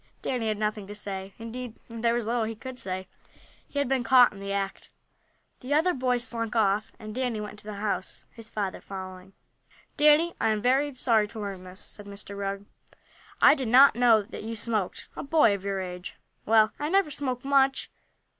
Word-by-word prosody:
Danny 245 -4 -1
had 215 -1 0
nothing 210 -1 -2
to 205 - -8
say, 195 -2 -5
indeed, 230 +1 -7
there 230 0 0
was 240 -2 -1
little 230 0 0
he 225 +1 -4
could 255 +3 -8
say. 185 0 -4 0.6
He - - -9
had 285 -1 +1
been 260 -1 +1
caught 245 0 +6
in 200 - -11
the 200 0 -5
act. 195 -1 -3 0.7
The 270 +3 -1
other 345 +4 +3
boys 250 -2 0
slunk 230 -1 -3
off, 210 -1 +2
and 215 -1 -8
Danny 250 -2 -2
went 210 0 -5
into 210 0 -15
the 210 -1 -6
house, 200 -2 -4
his 230 -1 -12
father 200 -3 -3
following. 185 0 -9 0.6
"Danny, 300 +3 +5
I 225 - +3
am 215 -1 +1
very 270 +3 +2
sorry 225 -4 +2
to 220 +1 -9
learn 195 -3 -6
this," 185 +1 -9
said 205 -1 -6
Mr. 200 0 -8
Rugg. 200 0 -4 0.8
"I - - +9
did 265 -5 -2
not 260 +4 +7
know 235 -3 +5
that 215 - -9
you 225 +1 -5
smoked 215 -3 -2
a - - -5
boy 280 -7 +4
of 200 -1 -4
your 195 -1 -2
age!" 180 0 -6 0.3
"Well, 220 0 +5
I 295 +1 -2
never 385 -3 +2
smoked 260 -3 -4
much. 275 -1 +2
220 Hz, 200 wpm, -27 LUFS, 200-255 Hz, 0.8 s, I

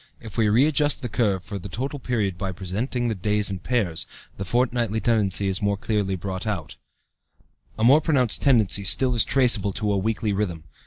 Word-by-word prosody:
If 110 -3 -11
we 110 -2 +2
readjust 145 +6 +3
the 120 - -3
curve 100 -5 0
for 100 -1 -6
the 100 - -8
total 135 +8 -4
period 110 -8 -1
by 95 +1 -4
presenting 110 +7 -3
the 115 - 0
days 105 +1 0
in 95 - -4
pairs, 100 -8 -1 0.3
the 100 - -5
fortnightly 120 0 0
tendency 100 -3 +1
is 95 0 -1
more 100 -1 0
clearly 100 -2 -1
brought 95 +3 -5
out 90 -9 -3
(Chart - - -11 1.0
I). - - -5
A - - +3
more 140 +6 +6
pronounced 130 -8 +1
tendency 110 -7 +3
still 125 +7 +2
is 115 -3 +4
traceable 115 -7 +3
to 105 0 -1
a 100 - +1
weekly 110 +1 -1
rhythm. 90 -6 -2
105 Hz, 200 wpm, -24 LUFS, 95-120 Hz, 1.0 s, more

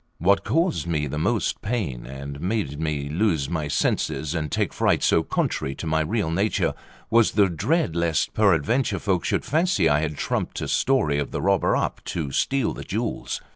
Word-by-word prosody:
What 95 +4 +3
caused 165 - 0
me 75 -3 0
the 75 +2 -3
most 110 +7 0
pain, 95 - -3
and 70 +2 -7
made 90 -7 -2
me 75 -3 -2
lose 80 -3 0
my 80 -3 -1
senses, 75 +1 0
and 75 -4 -3
take - - 0
fright - - +1
so 80 - +4
contrary 70 -3 -2
to 80 - -7
my 80 0 +1
real 90 +1 -1
nature 100 +6 +1 0.4
was 115 -1 +4
the 100 -1 +4
dread 90 - 0
lest 85 -2 0
peradventure 105 - +2
folk 90 -2 0
should - - -1
fancy 175 +5 +2
I 75 0 +3
had 75 -1 -3
trumped - - -2
a - - -3
story 100 - +2
of 70 - -2
the - - -4
robber - - +2
up - - -2
to 75 -5 -3
steal 135 - +1
the - - -7
jewels. - - -3
85 Hz, 185 wpm, -24 LUFS, 75-110 Hz, 0.4 s, so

